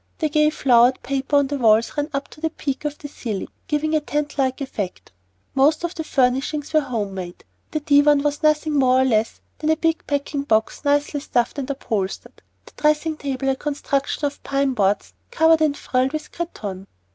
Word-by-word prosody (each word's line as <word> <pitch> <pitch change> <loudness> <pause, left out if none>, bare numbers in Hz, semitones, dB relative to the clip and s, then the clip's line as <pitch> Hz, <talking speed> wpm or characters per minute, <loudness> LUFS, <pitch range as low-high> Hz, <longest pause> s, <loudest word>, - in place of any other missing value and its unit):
The 310 - 0
gay 300 0 +3
flowered 250 -4 +3
paper 275 +2 -1
on 285 -1 +5
the 280 +1 -3
walls 225 -1 +3
ran 290 0 -1
up 275 -1 -3
to 305 - -15
the 320 - 0
peak 280 -2 -4
of 295 0 -2
the 290 - -8
ceiling, 225 -8 -5 0.2
giving 310 +1 0
a 310 - +4
tent 295 0 -3
like 265 -2 0
effect. 215 -9 -5 0.4
Most 295 +5 +3
of 345 0 -2
the 325 - -4
furnishings 280 +2 0
were 310 - +6
home 220 -8 -3
made. 180 -2 -7 0.3
The 310 - -3
divan 290 -1 +4
was 295 0 -1
nothing 305 0 +2
more 260 -2 +4
or - - +3
less 225 -3 0 0.2
than 310 - -1
a 315 - +4
big 330 0 0
packing 285 0 -1
box 220 -4 0
nicely 290 0 +1
stuffed 250 -1 -1
and 275 0 -4
upholstered; 215 -8 -4 0.2
the - - -16
dressing 305 +1 +1
table, 270 -2 -2
a 265 - +2
construction 285 0 -2
of 285 0 -4
pine 275 -1 0
boards 200 -3 0 0.2
covered 320 0 +4
and 295 -2 +2
frilled 255 +2 0
with 310 - -5
cretonne. 200 - -6
285 Hz, 195 wpm, -22 LUFS, 255-300 Hz, 0.4 s, were